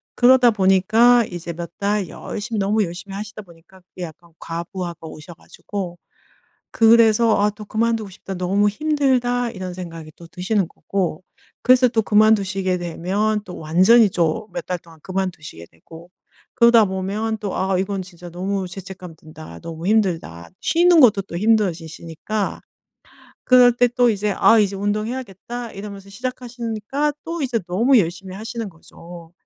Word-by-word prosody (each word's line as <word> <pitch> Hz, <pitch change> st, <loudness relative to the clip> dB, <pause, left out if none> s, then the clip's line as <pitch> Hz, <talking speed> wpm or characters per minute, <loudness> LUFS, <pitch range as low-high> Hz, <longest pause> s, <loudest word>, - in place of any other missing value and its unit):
그러다 250 Hz, 0 st, +6 dB
보니까 215 Hz, +5 st, +4 dB
이제 175 Hz, -3 st, -7 dB
몇 170 Hz, +1 st, -7 dB
달 205 Hz, -1 st, 0 dB
열심히 220 Hz, +2 st, -6 dB
너무 210 Hz, +2 st, +1 dB
열심히 180 Hz, +3 st, -8 dB
하시다 210 Hz, +1 st, -7 dB
보니까 175 Hz, +1 st, -19 dB
그게 180 Hz, 0 st, -10 dB
약간 170 Hz, +1 st, -11 dB
과부하가 170 Hz, 0 st, -6 dB
오셔 160 Hz, +3 st, -11 dB
가지고 180 Hz, 0 st, -7 dB, 0.7 s
그래서 225 Hz, -1 st, +5 dB
아 205 Hz, -, +3 dB
또 210 Hz, +1 st, -11 dB
'그만두고 225 Hz, 0 st, -1 dB
싶다. 195 Hz, 0 st, -8 dB
너무 195 Hz, +3 st, +1 dB
힘들다.' 250 Hz, -2 st, 0 dB
이런 185 Hz, -4 st, -6 dB
생각이 165 Hz, -3 st, -8 dB
또 170 Hz, -, -13 dB
드시는 185 Hz, +2 st, -1 dB
거고. 185 Hz, -2 st, -3 dB, 0.4 s
그래서 255 Hz, 0 st, +5 dB
또 225 Hz, -1 st, +1 dB
그만두시게 200 Hz, -3 st, +2 dB
되면 195 Hz, +5 st, -1 dB
또 180 Hz, -, -9 dB
완전히 190 Hz, +8 st, +5 dB
또 175 Hz, +4 st, -1 dB
몇 -, -, -5 dB
달 180 Hz, -, -2 dB
동안 165 Hz, -1 st, -18 dB
그만두시게 175 Hz, -, -5 dB
되고. 165 Hz, -, -15 dB, 0.5 s
그러다 235 Hz, -2 st, +6 dB
보면 200 Hz, +4 st, -3 dB
또 200 Hz, -2 st, -4 dB
'아 190 Hz, 0 st, 0 dB
이건 195 Hz, +1 st, -2 dB
진짜 175 Hz, -1 st, -12 dB
너무 190 Hz, +2 st, -3 dB
죄책감 185 Hz, -2 st, -10 dB
든다. 155 Hz, -, -12 dB
너무 165 Hz, +1 st, -7 dB
힘들다.' 165 Hz, -, 0 dB
쉬는 340 Hz, +1 st, +4 dB
것도 210 Hz, -6 st, +5 dB
또 170 Hz, -3 st, -7 dB
힘들어지시니까. 185 Hz, -1 st, -1 dB, 0.9 s
그럴 250 Hz, -1 st, +7 dB
때 245 Hz, 0 st, +4 dB
또 245 Hz, 0 st, +2 dB
이제 210 Hz, -1 st, -1 dB
'아 225 Hz, -, +5 dB
이제 200 Hz, -2 st, +2 dB
운동해야겠다.' 215 Hz, +2 st, -4 dB
이러면서 200 Hz, -1 st, -9 dB
시작하시니까 245 Hz, +3 st, -3 dB
또 335 Hz, -1 st, -4 dB
이제 245 Hz, -4 st, -1 dB
너무 235 Hz, +9 st, +4 dB
열심히 185 Hz, 0 st, -2 dB
하시는 225 Hz, +1 st, -5 dB
거죠. 170 Hz, 0 st, -14 dB
195 Hz, 335 characters per minute, -21 LUFS, 175-225 Hz, 0.9 s, 그럴